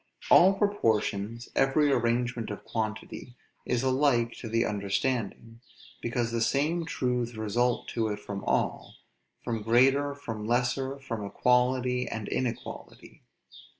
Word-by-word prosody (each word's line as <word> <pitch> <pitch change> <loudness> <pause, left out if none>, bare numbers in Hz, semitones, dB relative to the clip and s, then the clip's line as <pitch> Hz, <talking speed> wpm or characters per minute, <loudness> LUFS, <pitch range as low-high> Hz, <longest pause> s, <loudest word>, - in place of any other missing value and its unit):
All 190 +3 +8
proportions, 115 - 0
every 145 +2 +3
arrangement 120 -1 0
of 105 - -6
quantity, 110 +2 -5 0.3
is 125 0 0
alike 130 -3 +2
to 115 - -6
the 115 +1 +1
understanding, 115 +2 -2 0.4
because 120 0 -1
the 115 0 -1
same 150 +8 +1
truths 125 -2 -1
result 115 +3 0
to 115 -2 -1
it 105 -1 -3
from 100 -1 -6
all; - - -1 0.5
from 115 -2 -2
greater, 135 +6 +3
from 115 -6 -6
lesser, 125 +3 0
from 115 -6 -5
equality 125 +3 +1
and 110 -2 -5
inequality. 120 -3 -5
120 Hz, 120 wpm, -28 LUFS, 115-130 Hz, 0.5 s, All